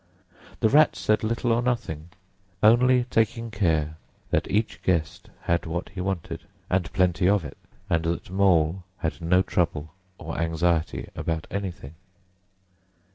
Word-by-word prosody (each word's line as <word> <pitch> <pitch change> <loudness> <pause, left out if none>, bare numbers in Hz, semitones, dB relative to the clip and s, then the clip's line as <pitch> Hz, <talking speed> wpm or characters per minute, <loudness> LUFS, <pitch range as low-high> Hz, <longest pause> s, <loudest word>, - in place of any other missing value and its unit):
The 110 - +4
Rat 150 +4 +5
said 110 0 +1
little 115 +2 0
or 115 +1 +3
nothing, 115 -11 -2 0.5
only 125 +3 +5
taking 115 +1 +1
care 80 -7 0 0.3
that - - +1
each 110 +3 0
guest 85 -4 -1
had 85 0 0
what 85 +2 -3
he 95 - -6
wanted, 85 -3 -3 0.3
and 90 -2 +1
plenty 90 -1 +2
of 100 -5 +2
it, 75 - -8 0.3
and 85 -4 +1
that 85 +2 -2
Mole 95 -2 +3
had 85 0 -3
no 90 +3 +3
trouble 80 -4 -1 0.2
or 80 +1 -6
anxiety 85 0 0
about 80 -1 -2
anything. 90 -7 -5
90 Hz, 135 wpm, -25 LUFS, 80-105 Hz, 0.5 s, Rat